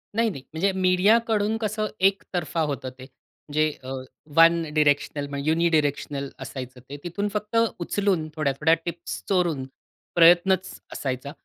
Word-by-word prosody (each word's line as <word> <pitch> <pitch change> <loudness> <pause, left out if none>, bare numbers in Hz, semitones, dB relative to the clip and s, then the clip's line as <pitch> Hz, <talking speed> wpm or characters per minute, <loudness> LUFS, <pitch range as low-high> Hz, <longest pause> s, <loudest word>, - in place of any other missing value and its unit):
नाही, 230 0 +2
नाही. 135 -10 -8
म्हणजे 185 +5 +1
मीडियाकडून 210 +3 +3
कसं 215 0 -1
एकतर्फा 180 -4 0
होतं 135 -2 -4
ते 130 - -9 0.5
जे 155 +1 +3
अ, 130 +1 -5 0.4
वन 165 +1 +6
डायरेक्शनल, 145 -1 +1 0.2
युनिडायरेक्शनल 150 -4 +1
असायचं. 130 -1 -7
ते 145 - -6
तिथून 190 +4 -2
फक्त 210 +1 -4 0.2
उचलून 180 -2 0
थोड्या-थोड्या 150 +1 +2
टिप्स 170 0 -5
चोरून 170 -8 +1 0.5
प्रयत्नच 175 +2 +5 0.2
असायचा. 130 +1 -4
170 Hz, 120 wpm, -25 LUFS, 145-195 Hz, 0.5 s, वन